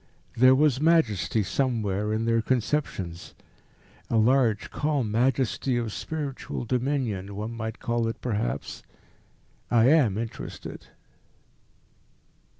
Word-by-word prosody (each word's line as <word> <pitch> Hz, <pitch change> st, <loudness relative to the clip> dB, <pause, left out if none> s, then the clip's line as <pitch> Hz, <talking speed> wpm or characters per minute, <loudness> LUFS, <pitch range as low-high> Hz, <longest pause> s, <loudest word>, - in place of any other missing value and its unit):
There 130 Hz, +2 st, +6 dB
was 140 Hz, -1 st, +3 dB
majesty 115 Hz, -, +2 dB
somewhere 105 Hz, -3 st, -1 dB
in 110 Hz, +1 st, -1 dB
their 115 Hz, 0 st, +2 dB
conceptions 110 Hz, -, -2 dB, 0.7 s
a 115 Hz, -, +1 dB
large, 115 Hz, -2 st, +2 dB
calm 145 Hz, -7 st, -1 dB
majesty 125 Hz, +2 st, +1 dB
of 115 Hz, -3 st, -2 dB
spiritual 145 Hz, -5 st, -5 dB
dominion, 120 Hz, -6 st, -1 dB
one 105 Hz, +3 st, -4 dB
might 110 Hz, -1 st, -5 dB
call 120 Hz, -2 st, -1 dB
it 115 Hz, -, -4 dB
perhaps. 105 Hz, -, -3 dB, 0.9 s
I 120 Hz, +1 st, +5 dB
am 135 Hz, -11 st, +4 dB
interested." 115 Hz, 0 st, -7 dB
115 Hz, 105 wpm, -26 LUFS, 110-130 Hz, 0.9 s, There